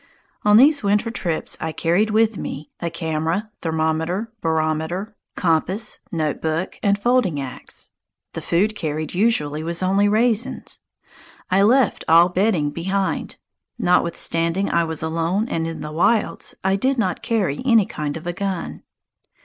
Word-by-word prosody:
On 210 Hz, 0 st, +6 dB
these 285 Hz, +4 st, +6 dB
winter 210 Hz, +3 st, +1 dB
trips 175 Hz, -8 st, -2 dB
I 160 Hz, -, -2 dB
carried 175 Hz, +7 st, +1 dB
with 220 Hz, 0 st, +2 dB
me 150 Hz, -5 st, -6 dB
a 170 Hz, -, -2 dB
camera, 165 Hz, +5 st, -2 dB
thermometer, 160 Hz, +6 st, -1 dB
barometer, 160 Hz, +6 st, -1 dB, 0.2 s
compass, 185 Hz, +5 st, 0 dB
notebook, 160 Hz, +1 st, -2 dB
and 200 Hz, 0 st, +2 dB
folding 210 Hz, -, +1 dB
axe. 135 Hz, -2 st, -5 dB, 0.4 s
The -, -, -5 dB
food 205 Hz, +6 st, +1 dB
carried 155 Hz, -4 st, -3 dB
usually 165 Hz, -7 st, +1 dB
was 170 Hz, +2 st, -1 dB
only 195 Hz, +2 st, +3 dB
raisins. 230 Hz, +2 st, 0 dB, 0.7 s
I 190 Hz, +1 st, +4 dB
left 245 Hz, +6 st, +3 dB
all 170 Hz, +2 st, +6 dB
bedding 180 Hz, -5 st, +1 dB
behind. 190 Hz, +5 st, -2 dB, 0.4 s
Notwithstanding 170 Hz, -2 st, +1 dB
I 170 Hz, -, +2 dB
was 160 Hz, -1 st, -3 dB
alone 165 Hz, +7 st, 0 dB
and 165 Hz, -5 st, -2 dB
in 165 Hz, -1 st, -6 dB
the 150 Hz, -, -6 dB
wilds, 205 Hz, +7 st, 0 dB
I 190 Hz, +1 st, +2 dB
did 260 Hz, +6 st, 0 dB
not 190 Hz, -6 st, -1 dB
carry 195 Hz, -11 st, -1 dB
any 230 Hz, -6 st, +4 dB
kind 150 Hz, -2 st, -4 dB
of 165 Hz, -, -10 dB
a 175 Hz, -, -2 dB
gun. 190 Hz, -2 st, -4 dB
180 Hz, 140 wpm, -21 LUFS, 160-210 Hz, 0.7 s, On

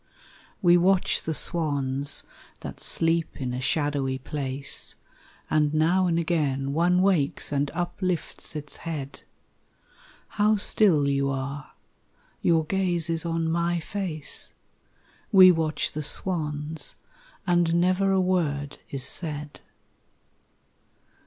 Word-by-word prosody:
We 175 Hz, 0 st, +6 dB
watch 185 Hz, +1 st, +2 dB
the 160 Hz, -, -3 dB
swans 140 Hz, -4 st, 0 dB, 0.4 s
that -, -, -8 dB
sleep 165 Hz, 0 st, +1 dB
in 125 Hz, -2 st, -3 dB
a 125 Hz, -, -3 dB
shadowy 145 Hz, -2 st, 0 dB
place, 135 Hz, 0 st, -2 dB, 0.5 s
And 150 Hz, -1 st, +1 dB
now 175 Hz, +4 st, +3 dB
and 165 Hz, -1 st, +1 dB
again 145 Hz, -5 st, 0 dB
one 180 Hz, +3 st, +3 dB
wakes 170 Hz, -10 st, +1 dB
and 140 Hz, 0 st, 0 dB
uplifts 175 Hz, -1 st, -3 dB
its 150 Hz, -1 st, -6 dB
head; 150 Hz, -4 st, -6 dB, 1.1 s
How 215 Hz, +1 st, +2 dB
still 190 Hz, -7 st, +3 dB
you 140 Hz, 0 st, +1 dB
are 135 Hz, +1 st, -5 dB, 0.7 s
your 165 Hz, -2 st, +2 dB
gaze 175 Hz, -2 st, 0 dB
is 165 Hz, +1 st, 0 dB
on 165 Hz, -1 st, -1 dB
my 170 Hz, +1 st, 0 dB
face 165 Hz, -5 st, -4 dB, 0.8 s
We 185 Hz, -3 st, +9 dB
watch 160 Hz, -3 st, -1 dB
the 155 Hz, -, -4 dB
swans 150 Hz, -1 st, -3 dB, 0.5 s
and 175 Hz, -2 st, +2 dB
never 185 Hz, +3 st, +2 dB
a 190 Hz, -, +3 dB
word 155 Hz, -6 st, -1 dB
is 135 Hz, -2 st, -3 dB
said. 150 Hz, -2 st, -2 dB
160 Hz, 115 wpm, -26 LUFS, 145-175 Hz, 1.1 s, We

